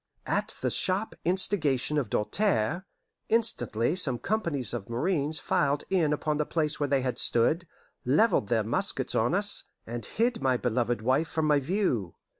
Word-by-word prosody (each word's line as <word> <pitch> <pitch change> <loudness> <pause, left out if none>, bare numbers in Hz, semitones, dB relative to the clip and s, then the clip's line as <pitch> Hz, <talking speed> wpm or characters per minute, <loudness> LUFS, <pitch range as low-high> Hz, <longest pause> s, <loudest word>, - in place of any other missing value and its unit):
At - - -2
the - - 0
sharp 195 +4 -1
instigation 155 -6 +2
of 125 -7 -4
Doltaire, 175 - 0 0.4
instantly 220 - +1
some 140 -9 +2
companies 170 - -1
of 115 -4 -6
marines 150 +4 -1
filed 145 0 0
in 170 -6 +2
upon 150 0 -1
the 150 - +1
place 155 -2 -1
where 145 -1 -1
they 135 -1 +2
had 125 -2 -3
stood, 155 +9 +1 0.4
leveled 140 - +2
their 110 +1 +1
muskets 110 - 0
on - - +1
us, - - +5 0.2
and 120 +1 -6
hid 235 -2 -1
my 130 -2 +1
beloved 120 -2 -1
wife 130 +7 +1
from 160 -1 -2
my 150 -1 +3
view. 140 - -2
145 Hz, 160 wpm, -27 LUFS, 120-180 Hz, 0.4 s, us